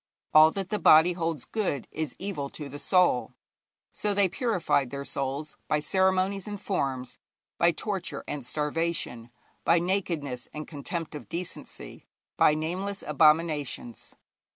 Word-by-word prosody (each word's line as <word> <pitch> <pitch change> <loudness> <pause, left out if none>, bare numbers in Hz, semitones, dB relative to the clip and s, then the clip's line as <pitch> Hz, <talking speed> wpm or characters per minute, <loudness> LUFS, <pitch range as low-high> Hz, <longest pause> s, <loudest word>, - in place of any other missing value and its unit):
All 155 +1 +9
that 195 -2 -3
the 210 - 0
body 160 +3 +7
holds 165 -5 -2
good 190 - -2
is 155 -1 -4
evil 180 -8 -4
to 150 - -6
the 145 +1 -8
soul.' 145 -7 +2 0.6
So 205 -1 -1
they 200 -1 +5
purified 180 - 0
their 140 +1 -5
souls 140 +3 -3
by 155 -1 +2
ceremonies 190 +4 +1
and 205 -1 -5
forms, 135 -11 -2 0.4
by - - +5
torture - - -3
and 145 -2 -4
starvation, 150 -4 -2 0.3
by 170 - +4
nakedness 165 -8 -1
and 155 0 -5
contempt 165 +3 -5
of 150 - -8
decency, 175 +1 -6 0.3
by 150 - +5
nameless 185 +6 -3
abominations. 150 -5 +1
160 Hz, 135 wpm, -28 LUFS, 145-185 Hz, 0.6 s, All